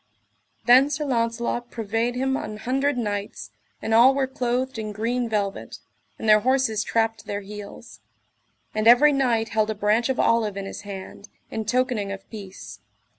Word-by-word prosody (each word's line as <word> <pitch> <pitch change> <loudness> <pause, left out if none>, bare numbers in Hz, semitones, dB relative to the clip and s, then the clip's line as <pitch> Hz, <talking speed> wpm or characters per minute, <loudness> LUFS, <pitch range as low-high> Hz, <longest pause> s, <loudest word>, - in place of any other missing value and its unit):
Then 255 +4 +6
Sir 300 +1 -2
Launcelot 235 -1 -1
purveyed 225 +2 -2
him 265 +1 0
an 215 -5 -5
hundred 270 +4 0
knights, 205 -3 -4 0.3
and 225 - -1
all 245 +4 +6
were 275 -1 +1
clothed 255 -1 -2
in 215 -1 -4
green 235 +3 -1
velvet, 200 -2 -3 0.4
and - - -5
their 215 0 +7
horses 250 -2 +1
trapped 225 0 0
to - - -16
their 205 0 -3
heels; 205 0 -10 0.7
and 215 +1 0
every 275 +5 +7
knight 240 -5 +1
held 215 0 +1
a 220 - -2
branch 210 +4 +1
of 260 - -1
olive 220 -4 +2
in 195 - -4
his - - -7
hand, 200 0 -9 0.2
in 220 -1 -3
tokening 235 -3 0
of 195 0 -8
peace. 200 -4 -9
230 Hz, 170 wpm, -24 LUFS, 210-250 Hz, 0.7 s, their